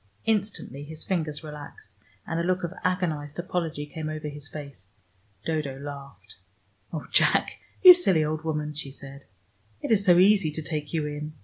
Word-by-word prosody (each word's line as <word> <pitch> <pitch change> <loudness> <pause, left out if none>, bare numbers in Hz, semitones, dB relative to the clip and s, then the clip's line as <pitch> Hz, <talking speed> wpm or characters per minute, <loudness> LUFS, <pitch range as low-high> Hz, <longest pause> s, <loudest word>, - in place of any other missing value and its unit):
Instantly 200 - -1
his 155 +2 -7
fingers 160 -5 -2
relaxed; 150 - -10 0.3
and 165 0 -2
a - - 0
look 185 +1 0
of 175 +1 -3
agonized 160 -6 -1
apology 170 -4 -2
came 155 +1 -5
over 155 -1 -4
his 145 0 -8
face. 140 -11 -9 0.6
Dodo 150 -4 -2
laughed. 140 -7 -9 0.5
"Oh, 160 -3 -4
Jack, - - +3 0.2
you 365 -1 +13
silly 190 - +3
old 155 0 -2
woman," 150 -1 -2
she 150 -1 -6
said. 140 0 -12 0.5
"It - - -3
is 205 -3 +4
so 175 -3 +6
easy 195 -2 +5
to 160 - -4
take 150 -2 -4
you 160 -3 0
in." 150 +1 -5
155 Hz, 170 wpm, -26 LUFS, 145-175 Hz, 0.6 s, you